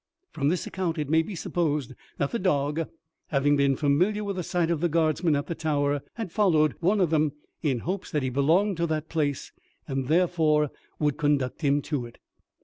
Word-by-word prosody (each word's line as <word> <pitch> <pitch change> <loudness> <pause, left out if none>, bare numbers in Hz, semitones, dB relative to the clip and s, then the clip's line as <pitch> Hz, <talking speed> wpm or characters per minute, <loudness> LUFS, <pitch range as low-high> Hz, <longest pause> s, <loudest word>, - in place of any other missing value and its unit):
From 140 -2 -1
this 175 +1 -1
account 175 -3 -2
it 150 -1 -2
may 160 0 +5
be 190 +5 -6
supposed 150 -6 -1 0.2
that 140 - -1
the 235 - -1
dog, 150 -3 0 0.4
having 145 0 +2
been 140 -1 +3
familiar 180 +10 +1
with 200 -1 -3
the - - -1
sight 175 -1 0
of 160 -3 -1
Guardsmen 160 0 +2
at 145 - -1
the - - -3
Tower, 145 -3 0
had 225 -7 -5
followed 160 -8 +3
one 195 +5 +2
of 175 -4 +2
them 155 -2 +2 0.3
in 135 -7 0
hopes 185 +3 -3
that 150 -3 -1
he 130 - -1
belonged 165 +9 +2
to 170 0 0
that 155 -1 -2
place, 145 -4 -1 0.4
and 135 -1 -2
therefore 155 -3 +2 0.3
would 150 -2 0
conduct 145 -2 0
him 145 -1 +2
to 135 -6 -3
it. 120 - -16
155 Hz, 195 wpm, -26 LUFS, 145-175 Hz, 0.4 s, may